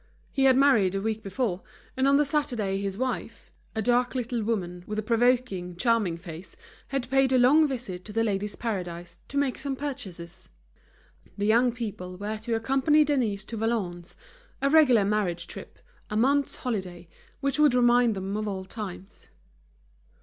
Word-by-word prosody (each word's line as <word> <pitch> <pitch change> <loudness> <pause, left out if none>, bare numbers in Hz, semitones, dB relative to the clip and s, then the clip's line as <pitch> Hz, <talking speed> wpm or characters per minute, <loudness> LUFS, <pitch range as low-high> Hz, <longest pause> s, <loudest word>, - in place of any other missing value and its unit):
He 270 -1 +1
had 260 -1 +6
married 235 -9 +4
a - - 0
week 220 +1 -2
before, 195 -2 -2 0.3
and 265 +1 +2
on 280 0 +5
the 295 - +3
Saturday 235 -10 -1
his 195 -1 -3
wife, 255 +1 -4 0.2
a 220 - -1
dark 245 +3 +2
little 245 -2 -2
woman, 180 -5 -2
with 210 - -4
a 215 - -1
provoking, 230 -6 +1
charming 215 -4 +1
face, 170 +1 -10 0.3
had 275 -2 -2
paid 270 -1 +3
a 260 - +4
long 290 +6 +5
visit 235 -10 -5
to 210 - -8
The 225 +2 +1
Ladies' 205 -1 -1
Paradise 175 -6 -5
to 285 - -5
make 280 -3 0
some 275 -1 -2
purchases. 195 - -7 0.9
The 205 - -1
young 235 +3 +4
people 200 -6 -6
were 210 +3 -4
to 230 +1 -2
accompany 270 +6 +3
Denise 235 -9 0
to 230 - -6
Valognes, 195 -6 -2 0.4
a 275 0 +1
regular 255 -10 +6
marriage 190 -5 0
trip, - - -10 0.3
a 210 - -2
month's 275 +4 +2
holiday, 185 -8 -4 0.3
which 275 +1 -1
would 295 -4 +5
remind 240 -2 +4
them 195 +1 -4
of 215 0 -2
old 190 -2 -5
times. 195 -3 -8
225 Hz, 170 wpm, -27 LUFS, 195-255 Hz, 0.9 s, had